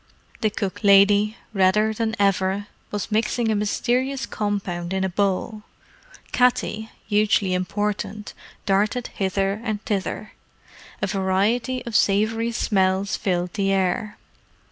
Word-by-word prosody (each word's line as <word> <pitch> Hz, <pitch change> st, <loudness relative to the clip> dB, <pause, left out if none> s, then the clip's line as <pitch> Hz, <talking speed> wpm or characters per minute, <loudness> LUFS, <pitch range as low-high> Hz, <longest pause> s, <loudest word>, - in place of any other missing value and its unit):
The 215 Hz, -, +2 dB
cook 200 Hz, 0 st, -4 dB
lady, 205 Hz, +2 st, +5 dB, 0.2 s
redder 210 Hz, +3 st, +3 dB
than 225 Hz, 0 st, -1 dB
ever, 195 Hz, 0 st, +1 dB, 0.2 s
was 205 Hz, +1 st, -4 dB
mixing 220 Hz, +1 st, +1 dB
a -, -, +1 dB
mysterious 250 Hz, +6 st, 0 dB
compound 190 Hz, -4 st, -3 dB
in 190 Hz, 0 st, 0 dB
a 190 Hz, -, 0 dB
bowl. 200 Hz, +3 st, -1 dB, 0.7 s
Katty, 240 Hz, -3 st, +1 dB, 0.2 s
hugely 205 Hz, -2 st, +2 dB
important, 205 Hz, +2 st, -2 dB, 0.3 s
darted 210 Hz, +5 st, +1 dB
hither 195 Hz, +2 st, -1 dB
and 215 Hz, -3 st, -2 dB
thither. 210 Hz, +1 st, -3 dB, 0.7 s
A -, -, +4 dB
variety 210 Hz, +7 st, 0 dB
of 235 Hz, -2 st, -5 dB
savoury 220 Hz, +4 st, +2 dB
smells 195 Hz, -3 st, +1 dB
filled 180 Hz, -2 st, -1 dB
the 195 Hz, -2 st, 0 dB
air. 195 Hz, +2 st, 0 dB
205 Hz, 120 wpm, -23 LUFS, 195-220 Hz, 0.7 s, lady